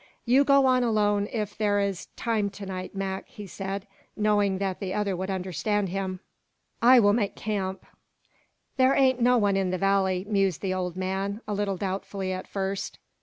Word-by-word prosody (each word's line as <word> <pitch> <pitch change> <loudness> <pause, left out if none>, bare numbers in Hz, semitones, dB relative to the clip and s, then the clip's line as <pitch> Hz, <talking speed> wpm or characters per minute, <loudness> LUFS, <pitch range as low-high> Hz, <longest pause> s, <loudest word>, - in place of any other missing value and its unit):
"You 260 +3 +5
go 275 -1 +5
on 255 -1 +4
alone 205 -3 +2
if 210 -3 -3
there 205 -1 +1
is 200 -3 -2
time 220 -3 0
to 200 0 -9
night, 185 0 -6
Mac," 195 0 -3
he 210 - -10
said, 195 +1 -5 0.3
knowing 205 -2 +2
that 190 -1 -2
the 190 -2 -3
other 205 -2 0
would 190 +2 -4
understand 190 +2 -1
him. 190 0 -3 0.6
"I 250 +2 +8
will 205 -2 +5
make 210 -3 0
camp." 195 -3 -3 0.9
"There 260 +1 +4
ain't 260 -2 +3
no 245 +1 +5
one 205 -3 +2
in 195 -1 +1
the 185 - -1
valley," 190 -1 +1
mused 195 -4 +1
the 190 -2 -1
old 180 -2 -3
man, 195 +3 -2
a 210 - -2
little 200 -1 -1
doubtfully 190 0 -3
at 185 - -6
first. 195 0 -3
200 Hz, 180 wpm, -26 LUFS, 190-210 Hz, 0.9 s, I